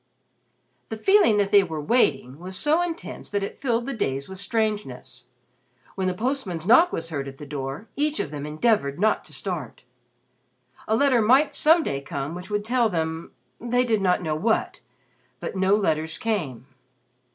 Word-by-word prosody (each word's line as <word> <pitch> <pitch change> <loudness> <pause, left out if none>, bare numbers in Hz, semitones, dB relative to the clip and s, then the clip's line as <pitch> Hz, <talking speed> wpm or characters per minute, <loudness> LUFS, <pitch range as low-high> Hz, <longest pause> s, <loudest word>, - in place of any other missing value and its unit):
The 220 - -4
feeling 385 - +4
that 200 -1 +1
they 205 -1 +7
were 160 -4 -5
"waiting" 150 - +1
was 185 +2 -5
so 310 +3 +3
intense 345 -1 -5
that 205 -1 -1
it 200 - -6
filled 240 -3 0
the 275 - -3
days 140 - -2
with 190 -1 -6
strangeness. 200 - -2 0.7
When 190 -1 -2
the 185 - -1
postman's 215 - -2
knock 290 - +6
was 165 0 -3
heard 140 -3 -3
at 135 0 -9
the 150 - -9
door, 140 +6 -5
each 300 +1 0
of 145 - -3
them 145 -1 -5
endeavored 150 -3 +1
not 215 +2 +2
to - - -15
start. 175 - -4 1.0
A 220 - +2
letter 255 -1 +3
might 260 +8 +4
some 320 +2 +4
day 140 - -3
come 140 0 -5
which 180 +2 -8
would 205 0 -2
tell 240 -1 +2
them 160 -2 -3 0.3
they 245 +1 +1
did 225 -4 +1
not 180 -1 +2
know 155 -2 -1
what. 220 +8 0 0.6
But - - -5
no 190 +1 +3
letters 160 -6 -1
came. 155 - -3
195 Hz, 175 wpm, -24 LUFS, 155-235 Hz, 1.0 s, they